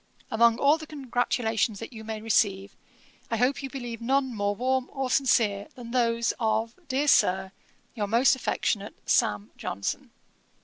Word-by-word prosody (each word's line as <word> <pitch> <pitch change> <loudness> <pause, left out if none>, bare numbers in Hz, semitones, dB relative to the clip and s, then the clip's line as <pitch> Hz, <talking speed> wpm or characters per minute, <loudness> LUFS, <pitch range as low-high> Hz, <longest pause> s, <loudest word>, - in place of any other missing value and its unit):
Among 230 0 +4
all 290 +4 +4
the 315 - -9
congratulations 245 -6 -1
that 230 - -8
you 220 -1 -9
may 220 -1 -5
receive, 200 -3 +1 0.5
I 230 - -1
hope 250 +5 +1
you 270 - -5
believe 240 -4 -6
none 265 +1 +1
more 205 -1 -1
warm 260 +3 0
or 270 -2 -3
sincere, 220 -7 +2
than 235 -2 -9
those 235 -2 +1
of, 225 0 0
dear 280 +2 0
Sir, 190 -7 +3 0.4
'Your 210 -4 -2
most 235 +6 +4
affectionate, 210 -5 -2
'SAM. 105 +1 +1
JOHNSON.' 100 +1 -4
230 Hz, 150 wpm, -27 LUFS, 215-260 Hz, 0.5 s, Among